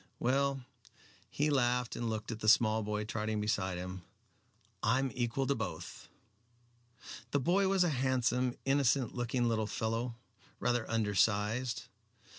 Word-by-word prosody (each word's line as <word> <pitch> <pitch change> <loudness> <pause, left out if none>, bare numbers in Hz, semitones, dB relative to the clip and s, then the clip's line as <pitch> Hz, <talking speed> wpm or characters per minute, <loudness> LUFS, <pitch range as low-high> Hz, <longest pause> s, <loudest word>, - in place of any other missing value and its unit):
Well" 135 +1 +1 0.6
he 150 +6 0
laughed 125 -3 +1
and 120 -1 -2
looked 110 +1 -3
at 110 - -5
the 110 - +2
small 110 0 +5
boy 105 0 -2
trotting 110 0 -2
beside 100 -3 -1
him 90 +1 -6 0.8
"I 115 +3 +3
am 135 -1 0
equal 120 +3 -1
to 140 - +2
both." 90 - -6 1.2
The 145 - +1
boy 185 +8 +2
was 190 -1 +3
a 175 - +2
handsome, 125 -2 +1
innocent 135 -2 +2
looking 120 0 0
little 110 -2 0
fellow, 115 +3 -2 0.4
rather 120 -2 0
undersized. 110 +2 +1
120 Hz, 135 wpm, -33 LUFS, 110-130 Hz, 1.2 s, small